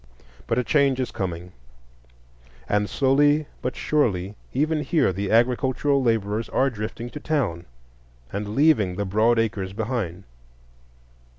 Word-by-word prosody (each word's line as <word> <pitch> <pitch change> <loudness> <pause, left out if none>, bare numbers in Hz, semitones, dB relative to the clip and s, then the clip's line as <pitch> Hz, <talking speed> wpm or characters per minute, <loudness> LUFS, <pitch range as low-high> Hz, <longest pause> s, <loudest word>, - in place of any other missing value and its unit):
But - - 0
a 125 - +2
change 140 -1 +2
is 125 -2 -2
coming, 90 -1 -4 1.2
and 105 0 0
slowly 145 +3 +3 0.2
but 125 - -3
surely 100 -11 0 0.2
even 155 +3 0
here 150 - +1
the 100 +2 -3
agricultural 130 +4 +2
laborers 110 -2 0
are 135 0 +1
drifting 115 +2 -6
to 150 - -7
town 120 - -2 0.7
and 105 +1 -4
leaving 135 - +3
the 100 +1 -2
broad 110 +5 +2
acres 105 -4 -1
behind. 105 -5 -3
115 Hz, 125 wpm, -24 LUFS, 100-135 Hz, 1.2 s, slowly